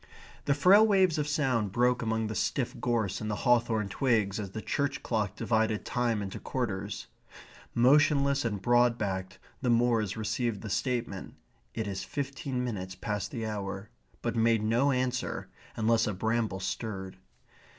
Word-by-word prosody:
The 140 - +2
frail 185 +8 +7
waves 190 -6 +3
of 150 - -1
sound 130 -9 0
broke 125 +3 +2
among 110 -1 0
the 110 - -3
stiff 115 +4 -1
gorse 115 -6 0
and 110 - -3
the 105 - -1
hawthorn 115 -4 +3
twigs 110 -4 +1
as 100 -2 -4
the 105 - -6
church 140 -1 -1
clock 105 -5 -1
divided 110 -2 0
time 120 -4 0
into 95 -1 -6
quarters. 100 -6 -3 0.7
Motionless 140 +2 +4
and 105 -4 -2
broad 120 +3 +3
backed 95 -3 -3 0.2
the 125 - 0
moors 115 -4 +2
received 110 0 -1
the 110 - -6
statement 115 -3 -2 0.4
"It 110 - -2
is 95 -1 -4
fifteen 140 -2 -3
minutes 95 -6 -4
past 105 -2 -3
the 115 -4 -4
hour," 100 -2 -5 0.3
but - - -1
made 115 -1 +3
no 120 +6 +3
answer, 125 -1 -2 0.3
unless 115 +1 +2
a 105 - -2
bramble 110 -1 -1
stirred. 95 -2 -4
115 Hz, 155 wpm, -29 LUFS, 105-125 Hz, 0.7 s, frail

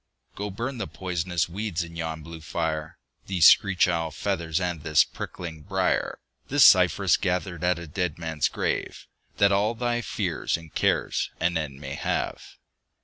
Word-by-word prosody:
Go 105 +1 -4
burn 120 +6 -4
those - - -3
poisonous 90 -2 -1
weeds 90 -1 -3
in 85 0 -10
yon 80 -1 -4
blue 80 +1 -9
fire, 80 -1 -3 0.3
These 90 -4 +3
screech 95 +1 +6
owl's 80 -3 -1
feathers 85 -3 -1
and 90 -4 -2
this 75 0 +4
prickling 80 -3 -7
briar, - - 0 0.3
This 145 0 +5
cypress 95 0 +5
gathered 90 -2 -2
at 90 0 +2
a 85 - -7
dead 85 +1 -2
man's 80 -2 -1
grave, - - -3 0.3
That 100 0 +5
all 105 +4 +2
thy 120 0 -1
fears - - -2
and 80 -2 -14
cares - - +1
an 85 0 +1
end 75 -4 -3
may 70 -1 -6
have. - - -2
85 Hz, 160 wpm, -26 LUFS, 80-95 Hz, 0.3 s, screech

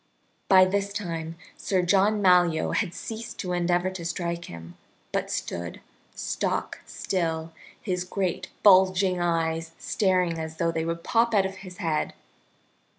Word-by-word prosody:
By 185 -1 +7
this 200 +1 -1
time 165 -5 -4 0.2
Sir 185 -2 0
John 200 +3 +3
Malyoe 175 -3 +4
had 195 -4 -1
ceased 225 0 -6
to 180 - -4
endeavor 175 +1 +1
to 185 -2 -7
strike 170 0 -3
him, 85 0 -10 0.4
but - - -1
stood 85 0 -4 0.4
stock - - -2
still, 165 -3 -2 0.3
his 180 -3 -2
great 180 0 -2
bulging 185 -1 +5
eyes 165 -1 0
staring 180 -4 +1
as 160 0 -6
though 165 -1 +1
they 165 -1 -2
would 165 0 -3
pop 230 -1 +2
out 195 -2 +4
of 190 0 -5
his 185 -1 -10
head. 165 -6 -1
180 Hz, 145 wpm, -26 LUFS, 165-190 Hz, 0.4 s, By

